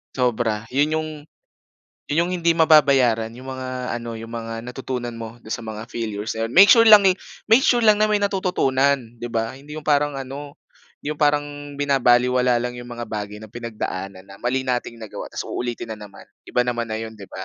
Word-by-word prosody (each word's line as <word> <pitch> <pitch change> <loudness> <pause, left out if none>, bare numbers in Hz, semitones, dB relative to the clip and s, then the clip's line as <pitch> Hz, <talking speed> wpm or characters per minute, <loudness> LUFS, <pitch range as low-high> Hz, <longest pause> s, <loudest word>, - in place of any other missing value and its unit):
Sobra. 115 -3 0
'Yon 145 +4 +1
'yong 155 0 -1 1.0
'yon 145 - -1
'yong 180 - -4
hindi 170 0 +3
mababayaran, 135 -8 +4
'yong 120 +3 -12
mga 130 0 -6 0.3
ano, 115 -1 -6
'yong 115 +1 -9
mga 115 -1 -5
natutunan 125 -1 -5
mo 115 0 -8
do'n 110 - -5
sa - - -3
mga 110 -1 -7
failures, 110 -2 -4
ayan. 115 0 -2
Make 190 - +8
sure 230 -2 +6
lang 210 -2 +9
eh 190 - +6 0.3
make 225 +4 +5
sure 240 -3 +3
lang 210 -1 +5
na 215 - +4
may 210 - +3
natututunan, 140 - 0
'di 120 - -4
ba? 115 0 -2
Hindi 145 +3 -11
'yong 155 - -7
parang 145 -1 +2
ano 140 +2 -7 0.4
hindi 150 - -4
'yong 150 - -14
parang 145 0 +3 0.3
binabalewala 125 -3 +3
lang 120 +1 -2
'yong 120 0 -9
mga 120 -1 -6
bagay 105 -2 -5
na 110 0 -12
pinagdaanan 100 -5 -5
na 100 0 -14
mali 130 +2 -1
nating 125 -2 -2
nagawa, 110 -2 -8
tapos - - -5
uulitin 120 -2 -4
na 110 - -8
naman. 100 - -15 0.2
Iba 125 - +1
naman 120 -1 -2
na 110 - -3
'yon, 110 0 -6
'di 100 -3 -12
ba? 95 - -7
125 Hz, 205 wpm, -22 LUFS, 115-145 Hz, 1.0 s, lang